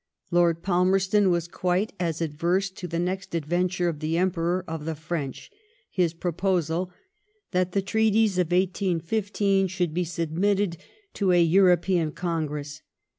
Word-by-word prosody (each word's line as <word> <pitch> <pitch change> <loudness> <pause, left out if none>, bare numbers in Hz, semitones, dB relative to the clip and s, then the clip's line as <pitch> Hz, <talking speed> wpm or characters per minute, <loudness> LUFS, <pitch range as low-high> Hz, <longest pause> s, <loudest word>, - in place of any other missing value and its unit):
Lord 170 -1 +2
Palmerston 190 +2 +3
was 170 -1 0
quite 180 +4 -1
as 165 -2 -2
adverse 170 +5 0
to 185 -1 -7
the 170 0 -3
next 180 +1 -2
adventure 175 +3 0
of 160 -4 -2
the 160 +2 -1
Emperor 180 0 0
of 160 -2 -5
the 160 0 -2
French, 155 - -5 0.4
his 175 -3 +1
proposal 175 0 -1 0.6
that 180 -1 0
the 195 - +1
treaties 220 -1 +2
of 180 - +2
1815 195 +2 +1
should 180 -3 -2
be 180 +2 0
submitted 170 +3 0 0.4
to 195 -3 +1
a 175 - +5
European 175 -1 +3
Congress. 150 -4 -3
175 Hz, 135 wpm, -26 LUFS, 165-190 Hz, 0.6 s, a